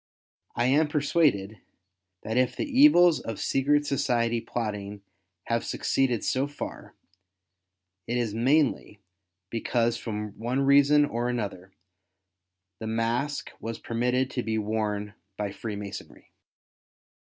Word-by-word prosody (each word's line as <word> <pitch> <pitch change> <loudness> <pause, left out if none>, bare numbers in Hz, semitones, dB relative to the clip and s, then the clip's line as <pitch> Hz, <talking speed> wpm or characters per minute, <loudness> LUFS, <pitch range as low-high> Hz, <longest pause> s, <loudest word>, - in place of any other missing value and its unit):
I 120 - +1
am 145 +5 +3
persuaded, 140 - +1 0.6
that 110 - -3
if 125 0 +2
the - - -2
evils 260 - +6
of 115 -2 -6
secret 145 +2 +2
society 120 -4 0
plotting 105 -4 -4 0.4
have 115 0 -1
succeeded 125 -4 0
so 130 +2 0
far, 145 - -8 1.1
it 120 - -1
is 115 -4 -1
mainly, 130 -3 +1 0.5
because 115 0 0
from 105 -2 -4
one 125 +4 -1
reason 140 +2 +5
or 120 -2 -2
another, 100 -6 -4 1.1
the 110 - -5
mask 115 +6 -1
was 115 0 -5
permitted 125 +3 -1
to 125 - -2
be 110 -1 -2
worn 105 -1 -2 0.2
by 105 -1 -2
Freemasonry. 100 -1 -8
120 Hz, 115 wpm, -27 LUFS, 110-140 Hz, 1.1 s, evils